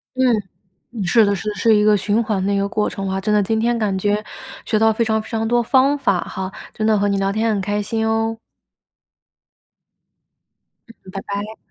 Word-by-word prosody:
嗯， 260 Hz, -, +1 dB, 0.7 s
嗯， 225 Hz, -4 st, -4 dB
是 220 Hz, +6 st, +4 dB
的 200 Hz, 0 st, +1 dB
是 195 Hz, +3 st, -6 dB
的， 210 Hz, -, -5 dB
是 225 Hz, 0 st, +3 dB
一 210 Hz, -, +3 dB
个 210 Hz, 0 st, +5 dB
循 205 Hz, +3 st, +1 dB
环 210 Hz, -4 st, -1 dB
的 200 Hz, -, +1 dB
一 -, -, +1 dB
个 200 Hz, 0 st, 0 dB
过 210 Hz, 0 st, -1 dB
程 195 Hz, 0 st, -5 dB
啊。 190 Hz, 0 st, -2 dB
真 210 Hz, +2 st, 0 dB
的 210 Hz, -, +4 dB
今 220 Hz, +3 st, 0 dB
天 235 Hz, +1 st, +1 dB
感 205 Hz, -4 st, 0 dB
觉 205 Hz, +2 st, 0 dB, 0.4 s
学 215 Hz, -, +1 dB
到 225 Hz, 0 st, +4 dB
非 230 Hz, +1 st, 0 dB
常 220 Hz, 0 st, +1 dB
非 220 Hz, -, -12 dB
常 225 Hz, -1 st, -1 dB
多 240 Hz, +1 st, +2 dB
方 265 Hz, +4 st, +3 dB
法 200 Hz, -10 st, +1 dB
哈， 190 Hz, 0 st, -5 dB, 0.2 s
真 215 Hz, -, -2 dB
的 220 Hz, -1 st, +3 dB
和 205 Hz, 0 st, +1 dB
你 200 Hz, 0 st, +1 dB
聊 195 Hz, 0 st, 0 dB
天 220 Hz, +2 st, 0 dB
很 210 Hz, -3 st, 0 dB
开 205 Hz, +2 st, -1 dB
心 220 Hz, +2 st, -2 dB
哦。 225 Hz, 0 st, 0 dB, 2.5 s
嗯， 230 Hz, -4 st, -15 dB
拜 195 Hz, -, -4 dB
拜。 205 Hz, +2 st, -5 dB
215 Hz, 235 characters per minute, -20 LUFS, 200-225 Hz, 2.5 s, 个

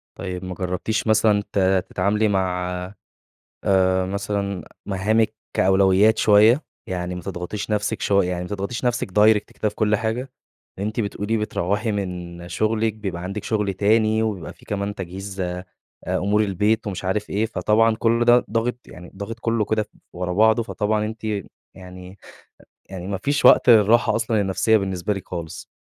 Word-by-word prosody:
طيب 90 Hz, -1 st, -5 dB
ما 90 Hz, -, -5 dB
جربتيش 95 Hz, +5 st, -2 dB
مثلًا 110 Hz, -1 st, +3 dB
ت 100 Hz, -, +1 dB, 0.3 s
تتعاملي 105 Hz, +4 st, +1 dB
مع 90 Hz, -2 st, 0 dB, 0.9 s
آآ 95 Hz, -1 st, +2 dB
مثلًا 100 Hz, 0 st, -3 dB, 0.2 s
مهامِك 105 Hz, +3 st, +1 dB, 0.2 s
كأولويات 95 Hz, +3 st, +4 dB
شويّة، 110 Hz, +7 st, +5 dB, 0.3 s
يعني 90 Hz, -1 st, -3 dB
ما 90 Hz, -, -6 dB
تضغطيش 95 Hz, +3 st, -5 dB
نفسِك 105 Hz, +1 st, -1 dB
شو 100 Hz, -1 st, +3 dB
يعني 90 Hz, 0 st, -2 dB
ما -, -, -6 dB
تضغطيش 105 Hz, +5 st, -4 dB
نفسِك 120 Hz, -5 st, -1 dB
direct 105 Hz, +2 st, +5 dB, 0.2 s
كده 110 Hz, -, -1 dB
في 105 Hz, -, -17 dB
كل 105 Hz, 0 st, +2 dB
حاجة، 115 Hz, +4 st, -3 dB, 0.5 s
أنتِ 110 Hz, +3 st, -3 dB
بتقولي 105 Hz, +1 st, -1 dB
بتروّحي 105 Hz, +1 st, -1 dB
من 90 Hz, -3 st, -5 dB
شغلِك، 110 Hz, +3 st, 0 dB
بيبقى 95 Hz, -5 st, -5 dB
عندِك 95 Hz, +3 st, -5 dB
شغل 105 Hz, -3 st, -1 dB
تاني، 110 Hz, +3 st, +2 dB
وبيبقى 100 Hz, -7 st, -4 dB
في -, -, -21 dB
كمان 100 Hz, 0 st, -3 dB
تجهيز 95 Hz, +1 st, -6 dB
أ 90 Hz, 0 st, -3 dB, 0.4 s
أمور 105 Hz, +3 st, +1 dB
البيت 105 Hz, +3 st, 0 dB
ومش 95 Hz, -1 st, -5 dB
عارف 100 Hz, +3 st, -1 dB
إيه، 105 Hz, +3 st, 0 dB
فطبعًا 110 Hz, 0 st, +2 dB
كل 115 Hz, +1 st, +1 dB
ده 120 Hz, 0 st, +5 dB
ضاغط 115 Hz, +2 st, 0 dB
يعني 90 Hz, 0 st, -12 dB
ضاغط 110 Hz, +4 st, -6 dB
كلّه 115 Hz, -2 st, 0 dB
كده 110 Hz, -1 st, 0 dB
ف -, -, -21 dB, 0.3 s
ورا 90 Hz, 0 st, -3 dB
بعضه، 110 Hz, +3 st, +4 dB
فطبعًا 105 Hz, -1 st, -1 dB
أنتِ 110 Hz, +1 st, -7 dB, 0.5 s
يعني 90 Hz, 0 st, -11 dB, 0.7 s
يعني 95 Hz, -1 st, -7 dB
ما 100 Hz, -1 st, -2 dB
فيش 145 Hz, +9 st, 0 dB
وقت -, -, +7 dB
للراحة 110 Hz, 0 st, +5 dB
أصلًا 115 Hz, -2 st, 0 dB
النفسيّة 95 Hz, +3 st, +2 dB
بالنسبة 95 Hz, 0 st, -2 dB
لِك 95 Hz, -, -8 dB
خالص. 85 Hz, -3 st, -7 dB
105 Hz, 160 wpm, -22 LUFS, 95-110 Hz, 0.9 s, وقت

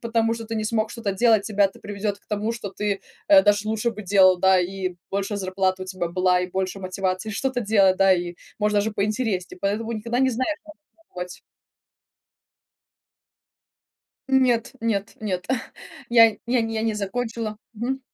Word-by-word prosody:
потому 230 Hz, -1 st, +1 dB
что 230 Hz, -, -7 dB
ты 225 Hz, +1 st, -5 dB
не 215 Hz, -, -1 dB
смог 220 Hz, 0 st, 0 dB
что-то 225 Hz, -5 st, -3 dB
делать, 220 Hz, 0 st, +4 dB
тебя 205 Hz, -1 st, +2 dB
это 195 Hz, -, -2 dB
приведёт 205 Hz, 0 st, -3 dB
к -, -, -36 dB
тому, 210 Hz, +2 st, -1 dB
что 230 Hz, -3 st, -6 dB
ты, 205 Hz, -2 st, 0 dB, 0.3 s
э, 295 Hz, -1 st, +8 dB
даже 205 Hz, -1 st, +2 dB
лучше 220 Hz, +2 st, 0 dB
бы 215 Hz, -1 st, -8 dB
делал, 185 Hz, -2 st, +6 dB
да, 190 Hz, 0 st, +5 dB
и 185 Hz, 0 st, -3 dB
больше 200 Hz, +1 st, -2 dB
зарплата 185 Hz, -1 st, -1 dB
у 185 Hz, -, -7 dB
тебя 185 Hz, -2 st, -3 dB
была 180 Hz, +1 st, +2 dB
и 180 Hz, -, -4 dB
больше 190 Hz, +1 st, -2 dB
мотивации 185 Hz, +2 st, -2 dB
что-то 260 Hz, +4 st, -1 dB
делать, 200 Hz, -3 st, +4 dB
да, 195 Hz, 0 st, +5 dB
и 175 Hz, -1 st, -1 dB, 0.3 s
может 210 Hz, 0 st, +1 dB
даже 205 Hz, +2 st, +2 dB
поинтереснее, 210 Hz, -3 st, -2 dB
поэтому 215 Hz, +3 st, -1 dB
никогда 230 Hz, +3 st, -2 dB
не 265 Hz, 0 st, +3 dB
знаешь, 260 Hz, +6 st, -1 dB, 0.3 s
нужно 330 Hz, -, -32 dB
пробовать. 180 Hz, 0 st, -6 dB, 2.9 s
Нет, 255 Hz, -4 st, +2 dB
нет, 215 Hz, -3 st, -1 dB
нет. 185 Hz, -4 st, -3 dB, 0.6 s
Я 230 Hz, -2 st, +6 dB
я 245 Hz, 0 st, +2 dB
нь 225 Hz, 0 st, -3 dB
я 220 Hz, -, -1 dB
не 225 Hz, -1 st, 0 dB
закончила. 220 Hz, +1 st, -3 dB, 0.2 s
Мгм. 255 Hz, +5 st, -3 dB
210 Hz, 170 wpm, -24 LUFS, 190-230 Hz, 2.9 s, э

